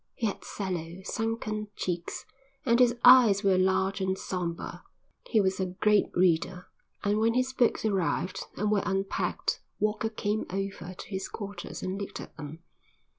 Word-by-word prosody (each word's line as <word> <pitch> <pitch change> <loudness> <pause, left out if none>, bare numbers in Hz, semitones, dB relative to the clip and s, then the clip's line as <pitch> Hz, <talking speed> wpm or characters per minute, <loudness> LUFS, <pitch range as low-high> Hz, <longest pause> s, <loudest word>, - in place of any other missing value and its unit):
He 230 - -2
had 205 - -2
sallow, 180 -2 -4
sunken 215 0 -2
cheeks, 175 -2 -3 0.4
and 235 -1 +4
his 245 -1 +5
eyes 245 -6 +8
were 190 -2 +4
large 190 +1 +2
and 190 0 0
sombre. 175 -3 -4 0.5
He 225 - +4
was 190 -1 +1
a 190 - 0
great 210 -1 +4
reader, 180 0 +2 0.4
and 205 +1 +2
when 225 +1 +2
his 255 +1 +1
books 240 -3 +2
arrived 185 -2 0
and 210 0 +1
were 205 -2 +3
unpacked 195 - -1 0.2
Walker 215 +1 0
came 215 -1 -2
over 190 -1 -4
to - - -9
his 190 -1 -4
quarters 200 -4 -7
and 190 +2 -3
looked 200 - -5
at - - -10
them. 155 +2 -8
195 Hz, 160 wpm, -29 LUFS, 185-215 Hz, 0.5 s, eyes